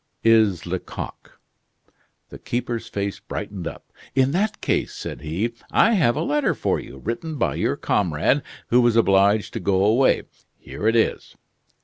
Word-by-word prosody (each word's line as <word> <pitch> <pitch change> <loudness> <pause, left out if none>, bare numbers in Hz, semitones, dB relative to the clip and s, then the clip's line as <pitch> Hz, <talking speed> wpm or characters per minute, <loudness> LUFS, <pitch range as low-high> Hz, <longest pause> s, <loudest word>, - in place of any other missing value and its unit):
"Is 110 -6 +4
Lecoq." 90 +1 -7 0.9
The - - -11
keeper's 120 -1 -3
face 100 -1 -3
brightened 95 -4 -6
up. - - -10 0.2
"In 135 0 +3
that 210 +6 0
case," - - -1
said - - -6
he, 90 +10 -2 0.2
"I 230 - +4
have 160 - +3
a - - -1
letter 150 0 +1
for - - 0
you, 65 - -10
written 120 - -4
by 120 -4 0
your - - 0
comrade, 90 - +1 0.3
who 125 +1 +5
was 120 -1 +3
obliged 100 -1 +3
to 115 - -3
go 95 0 +2
away. 120 +6 +3 0.3
Here 105 - -5
it 115 - +3
is." 115 - 0
115 Hz, 155 wpm, -23 LUFS, 100-125 Hz, 0.9 s, who